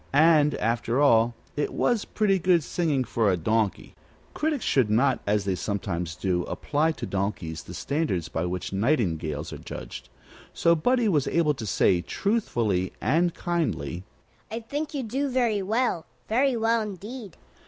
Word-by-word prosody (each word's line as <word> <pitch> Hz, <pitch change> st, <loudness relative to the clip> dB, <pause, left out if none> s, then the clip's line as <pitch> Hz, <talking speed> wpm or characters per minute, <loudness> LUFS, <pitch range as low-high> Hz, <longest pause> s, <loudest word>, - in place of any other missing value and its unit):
And, 150 Hz, 0 st, +5 dB
after 115 Hz, +2 st, 0 dB
all, 115 Hz, -4 st, +4 dB, 0.2 s
it 145 Hz, -, -1 dB
was 240 Hz, -4 st, +1 dB
pretty 195 Hz, -3 st, +1 dB
good 175 Hz, -2 st, +3 dB
singing 150 Hz, -6 st, 0 dB
for 115 Hz, -3 st, +1 dB
a 90 Hz, -, +2 dB
donkey. 110 Hz, +4 st, -1 dB, 0.4 s
Critics 300 Hz, -5 st, -1 dB
should 130 Hz, -6 st, +3 dB
not, 130 Hz, +5 st, +3 dB
as 105 Hz, -1 st, +1 dB
they 95 Hz, -, +1 dB
sometimes 90 Hz, -3 st, -3 dB
do, 90 Hz, -1 st, 0 dB
apply 155 Hz, +2 st, 0 dB
to -, -, -6 dB
donkeys 95 Hz, -5 st, -3 dB
the 90 Hz, -, -10 dB
standards 120 Hz, -, -1 dB
by 80 Hz, +2 st, -2 dB
which 90 Hz, +2 st, -4 dB
nightingales 85 Hz, -, 0 dB
are -, -, -7 dB
judged. -, -, -8 dB, 0.5 s
So 170 Hz, -, +4 dB
Buddie 240 Hz, +8 st, +2 dB
was 150 Hz, -9 st, +2 dB
able 160 Hz, -3 st, +2 dB
to 115 Hz, -6 st, -6 dB
say, 90 Hz, -1 st, +3 dB
truthfully 115 Hz, -, -1 dB
and 170 Hz, +5 st, +1 dB
kindly: 160 Hz, -, -2 dB, 0.5 s
"I 225 Hz, +2 st, -4 dB
think 290 Hz, +6 st, -4 dB
you 275 Hz, -, -2 dB
do 270 Hz, +5 st, -1 dB
very 240 Hz, -5 st, +1 dB
well; 215 Hz, -3 st, 0 dB, 0.2 s
very 255 Hz, +3 st, +2 dB
well, 225 Hz, 0 st, +2 dB
indeed." 210 Hz, +1 st, -7 dB
145 Hz, 155 wpm, -26 LUFS, -, 0.5 s, And